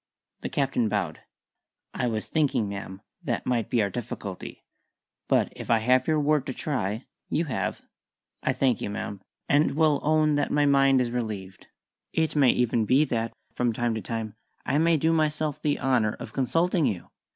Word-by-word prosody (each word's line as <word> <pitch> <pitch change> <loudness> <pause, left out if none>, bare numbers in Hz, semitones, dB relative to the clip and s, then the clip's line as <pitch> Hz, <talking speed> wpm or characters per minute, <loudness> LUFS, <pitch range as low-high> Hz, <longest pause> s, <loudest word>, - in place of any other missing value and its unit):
The - - -4
Captain 130 -5 0
bowed. - - -2 0.7
"I 125 - -1
was 110 -2 -2
thinking, 145 -8 +1
ma'am, 100 -1 -6 0.2
that - - -2
might 120 -3 0
be 115 -3 +2
our 100 - -1
difficulty. 105 -5 -6 0.6
But - - +2
if - - -8
I 115 - +5
have 125 +3 +2
your 155 -1 +3
word 150 -2 +1
to 130 - -4
try 110 -6 -2
" - - -55
"You 165 +3 0
have." 95 -10 -3 0.6
"I - - +1
thank 130 -5 +1
you, - - -2
ma'am, 100 -1 -5 0.3
and 145 -1 +3
will 155 -2 +3
own 155 0 +3
that 145 - 0
my 145 0 +2
mind 135 -2 +4
is 120 -1 -1
relieved. 105 -6 -5 0.5
It 160 -1 0
may 140 -4 +5
even 120 -2 +2
be 135 +7 +4
that, 115 -4 -1 0.2
from 120 -2 0
time 120 +1 0
to 110 - -3
time, 110 -2 -4 0.3
I 145 - +1
may 165 0 +4
do 160 +3 +2
myself 155 -2 0
the 145 -1 0
honour 125 -5 +2
of - - -9
consulting 165 +5 +1
you. 90 -4 -4
130 Hz, 185 wpm, -26 LUFS, 110-150 Hz, 0.7 s, I